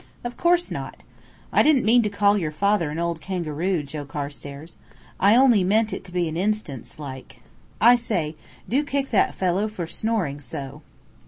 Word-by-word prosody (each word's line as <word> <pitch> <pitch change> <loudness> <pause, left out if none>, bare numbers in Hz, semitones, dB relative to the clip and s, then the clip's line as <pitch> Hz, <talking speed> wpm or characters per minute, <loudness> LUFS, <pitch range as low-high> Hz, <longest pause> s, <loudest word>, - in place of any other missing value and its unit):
"Of 240 0 -5
course 350 0 +2
not. - - -6 0.5
I - - +5
didn't 295 -6 +4
mean 235 +3 +5
to 210 - 0
call 200 0 +3
your 170 -7 -1
father 195 +1 +1
an 150 - -5
old 170 -1 -2
kangaroo, 175 -1 -2
Joe 145 +1 -6
Carstairs. 145 +2 -7 0.4
I 200 +3 +5
only 245 -6 +5
meant 215 +4 +2
it - - -5
to 180 - -11
be 175 -1 0
an 160 - -4
instance 170 - -3
like. 135 -3 -9 0.4
I 240 +2 +7
say, 180 -10 -2 0.3
do 275 +5 +1
kick 280 -1 -2
that 215 - +2
fellow 190 +3 0
for 210 -5 -5
snoring 170 -6 -2
so." 140 +2 -7
185 Hz, 175 wpm, -24 LUFS, 150-220 Hz, 0.5 s, I